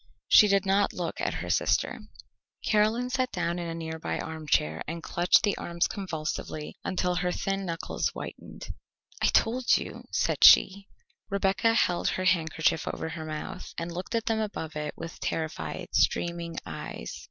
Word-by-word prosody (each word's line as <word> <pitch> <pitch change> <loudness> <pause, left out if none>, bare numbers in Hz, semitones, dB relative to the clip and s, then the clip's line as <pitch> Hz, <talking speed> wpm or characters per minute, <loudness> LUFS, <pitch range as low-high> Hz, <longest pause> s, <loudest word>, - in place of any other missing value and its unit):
She 210 - +8
did 200 -1 +2
not 195 +1 +2
look 175 -2 -4
at - - -1
her - - -6
sister. - - +1 0.7
Caroline 220 +4 +2
sat 255 -1 0
down 170 +1 -1
in 170 - -4
a 165 - -4
nearby 160 -1 -4
armchair, 150 - -1
and 165 +1 -5
clutched 175 +1 +3
the 205 - +2
arms 170 0 0
convulsively 155 -5 -4
until 180 -1 0
her 180 0 0
thin 195 +1 -2
knuckles 165 0 -2
whitened. - - -8 0.5
"I - - +4
told 240 +2 +3
you," - - -7
said - - 0
she. 195 +1 +7 0.4
Rebecca 195 +3 +2
held 175 -6 +2
her 185 - -1
handkerchief 160 -3 +2
over 160 - -3
her 160 0 -6
mouth, 155 -1 -6
and 165 +1 -3
looked 180 +6 -5
at 230 - 0
them 225 -1 +1
above 170 -7 -4
it 150 -1 -4
with 165 0 -8
terrified, 160 -1 -3
streaming 170 -1 +1
eyes. 80 -7 -7
175 Hz, 160 wpm, -28 LUFS, 160-200 Hz, 0.7 s, She